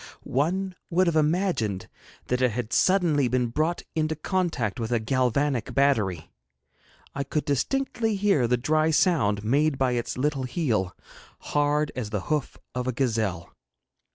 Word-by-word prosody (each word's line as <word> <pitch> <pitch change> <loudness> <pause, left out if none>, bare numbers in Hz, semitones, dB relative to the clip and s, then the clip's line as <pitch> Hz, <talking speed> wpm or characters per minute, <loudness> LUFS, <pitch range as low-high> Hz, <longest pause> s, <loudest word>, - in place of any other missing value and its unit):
One 185 +8 -1 0.2
would 185 +1 +3
have 170 -2 +1
imagined 155 - +1 0.4
that 125 +1 -1
it 125 - +4
had 120 -1 -4
suddenly 170 -8 +3
been 125 -1 0
brought 155 +8 -1
into 160 0 0
contact 155 - -1
with 115 0 -3
a 120 - +3
galvanic 130 +1 0
battery. 105 - +1 0.8
I 140 - -2
could 145 +1 -2
distinctly 225 - 0
hear 195 -11 +2
the 125 +1 +2
dry 155 +5 +2
sound 135 - +2
made 140 +5 +2
by 130 -1 +2
its 120 -1 -2
little 140 0 0
heel, 120 - -1 0.4
hard 145 +1 0
as 120 -5 -3
the 105 -2 -2
hoof 150 -3 -1 0.2
of 125 0 -3
a - - +2
gazelle. 110 -9 -1
140 Hz, 150 wpm, -26 LUFS, 120-160 Hz, 0.8 s, it